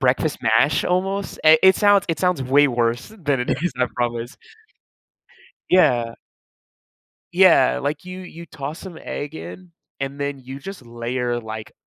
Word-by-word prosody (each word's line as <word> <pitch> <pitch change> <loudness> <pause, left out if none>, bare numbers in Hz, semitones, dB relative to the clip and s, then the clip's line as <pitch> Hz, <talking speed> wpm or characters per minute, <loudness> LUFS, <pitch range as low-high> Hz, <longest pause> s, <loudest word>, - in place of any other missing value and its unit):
breakfast 135 +3 +1
mash 115 +6 +3
almost, 195 +2 -1
i 155 0 +8
it 190 0 +6
sounds 205 -1 +4
it 165 -2 -1
sounds 180 -7 +1
way 140 +3 +4
worse 120 0 -1
than 145 -7 0
it 125 - -2
is, 175 - 0
I 125 - +2
promise. 120 +1 -3 1.3
Yeah. 120 -10 +3 1.2
Yeah, 65 0 +5
like, 145 - -3
you 185 0 -8
you 170 -2 -10
toss 150 +1 -7
some 185 -4 -10
egg 145 +2 -6
in, 180 +2 -10 0.3
and 135 +1 -4
then 140 -1 -3
you 130 +1 -9
just 180 0 -9
layer, 120 +1 -3
like, 110 -1 -8
140 Hz, 150 wpm, -21 LUFS, 120-180 Hz, 1.3 s, i